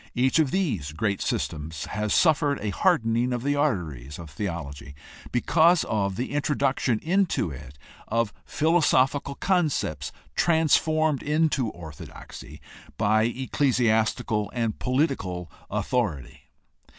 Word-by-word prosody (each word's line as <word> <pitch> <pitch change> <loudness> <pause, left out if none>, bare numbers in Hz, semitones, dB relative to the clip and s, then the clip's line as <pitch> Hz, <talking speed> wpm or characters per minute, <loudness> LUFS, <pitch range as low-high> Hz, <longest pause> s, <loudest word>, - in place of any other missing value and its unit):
Each 130 +5 +3
of 155 -4 +3
these 125 - -1
great 100 +5 -1
systems 80 0 -3
has 105 +1 -3
suffered 150 -4 +3
a 105 - -2
hardening 120 - +2
of 120 -1 -2
the 145 +1 +1
arteries 80 - -2
of 80 -3 -10
theology 70 -7 -5 0.4
because 165 +7 +4
of 100 -3 -1
the 125 +6 -3
introduction 140 -4 +1
into 180 - +1
it 70 0 -10 0.3
of 115 -2 0
philosophical 145 -3 +2
concepts 175 -5 0 0.2
transformed 155 -2 +2
into 150 -5 +1
orthodoxy 80 -6 -10 0.4
by 110 +2 +3
ecclesiastical 115 -4 +1
and 115 -3 -1
political 125 - -1 0.2
authority. 100 - -2
120 Hz, 110 wpm, -26 LUFS, 95-150 Hz, 0.4 s, because